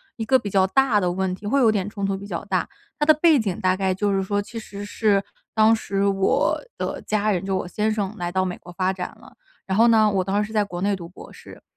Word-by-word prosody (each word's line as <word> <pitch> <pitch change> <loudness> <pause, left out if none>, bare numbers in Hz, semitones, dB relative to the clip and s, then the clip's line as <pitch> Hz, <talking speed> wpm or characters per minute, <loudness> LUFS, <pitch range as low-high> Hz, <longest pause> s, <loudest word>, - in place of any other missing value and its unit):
一 225 - -4
个 260 +3 +3
比 205 - -5
较 190 -1 +3
大 235 -2 +3
的 180 - +1
问 185 0 -1
题， 205 - -13
会 275 +7 +2
有 235 -4 +5
点 205 -2 0
冲 200 -2 -4
突 195 0 -1
比 200 - -9
较 205 - -5
大。 - - -1 0.3
它 295 - +1
的 310 - +7
背 315 -1 +4
景 200 -6 -2
大 185 0 +2
概 190 -1 0
就 200 +1 0
是 195 0 +1
说， 205 +1 -1
其 215 +3 -9
实 205 -2 -7
是 205 -1 +1 0.3
当 220 +1 +5
时 200 -2 -2
我 195 -1 +2 0.2
的 - - -4
家 215 0 0
人 190 -2 0
就 195 -1 0
我 180 - -4
先 210 +4 -1
生 210 -1 -2
来 175 -2 -3
到 185 +1 +1
美 180 -1 -4
国 175 - -13
发 185 +1 0
展 180 -1 -5
了， - - -17 0.3
然 190 0 -1
后 230 +2 +6
呢， 220 -2 +5
我 195 -2 0
当 195 +2 0
时 210 - -2
是 220 - -11
在 210 -1 +3
国 175 -3 -6
内 200 +1 +1
读 170 -3 -9
博 185 - -13
士。 - - -14
200 Hz, 295 characters per minute, -23 LUFS, 190-215 Hz, 0.3 s, 的